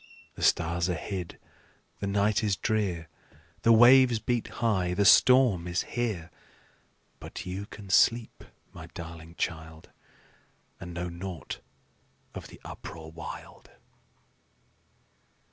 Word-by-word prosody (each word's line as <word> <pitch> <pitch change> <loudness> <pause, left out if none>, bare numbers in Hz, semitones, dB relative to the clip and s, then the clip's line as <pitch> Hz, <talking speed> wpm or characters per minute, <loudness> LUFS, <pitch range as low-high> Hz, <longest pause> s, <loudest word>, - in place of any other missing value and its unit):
The - - -11
stars 85 +1 +2
are 90 - 0
hid, 90 +1 -5 0.6
the 100 - -3
night 100 +2 +1
is 105 -3 +1
drear, 95 -6 -1 0.5
The 115 - +4
waves 120 +1 +7
beat 120 +1 -1
high, 95 -6 0
the 100 - +2
storm 115 -4 +6
is 90 +1 -1
here; 105 -9 -3 0.9
But - - -8
you 95 +2 -5
can 100 -3 -10
sleep, 115 +4 +3 0.3
my - - -10
darling 85 0 -9
child, 80 -1 -5 0.9
And 90 -1 -8
know 90 +1 -3
naught 85 0 -7 0.7
of - - -8
the - - -14
uproar 80 -1 -9
wild." 80 0 -10
95 Hz, 115 wpm, -28 LUFS, 85-110 Hz, 0.9 s, waves